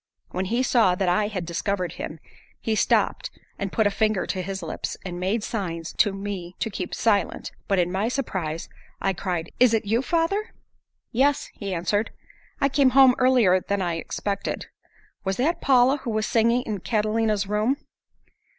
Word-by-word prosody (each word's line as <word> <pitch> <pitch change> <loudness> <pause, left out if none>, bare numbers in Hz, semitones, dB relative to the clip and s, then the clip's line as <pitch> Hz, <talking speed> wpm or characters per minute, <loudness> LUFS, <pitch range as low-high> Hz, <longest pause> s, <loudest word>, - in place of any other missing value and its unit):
When 185 +1 -2
he 235 +6 0
saw 225 -8 +4
that 190 0 -1
I 205 +4 +2
had 190 -5 -4
discovered 180 +1 -2
him, 155 - -6 0.4
he 225 - -1
stopped 215 - +1 0.3
and 195 -2 -3
put 220 - +2
a 205 - +3
finger 215 -1 +1
to 185 - -2
his 190 0 -5
lips, 160 - -4
and 175 -1 -5
made 200 +4 0
signs 170 -8 -4
to 205 - +4
me 195 -3 -5
to 225 - -2
keep 185 -2 -4
silent, 210 -3 0 0.2
but 195 - +2
in 175 -1 +2
my 195 +4 0
surprise 190 - -3 0.3
I 195 - 0
cried, 175 -3 -3
"Is 240 -2 +6
it 220 - -1
you, 225 +4 +2
father?" 345 +9 0 0.6
"Yes," 275 +4 +1
he 200 -2 -5
answered, 195 +5 0 0.5
"I 275 - +3
came 275 -1 +4
home 265 -2 +8
earlier 245 -8 +5
than 200 +1 -2
I 170 -2 -1
expected. 200 +4 -3 0.6
Was 190 0 -1
that 310 +8 +1
Paula 265 +1 +4
who 265 - -6
was 215 -1 0
singing 235 +2 +2
in 215 -4 -3
Catalina's 215 0 0
room?" 210 +7 +1
205 Hz, 175 wpm, -25 LUFS, 185-235 Hz, 0.6 s, home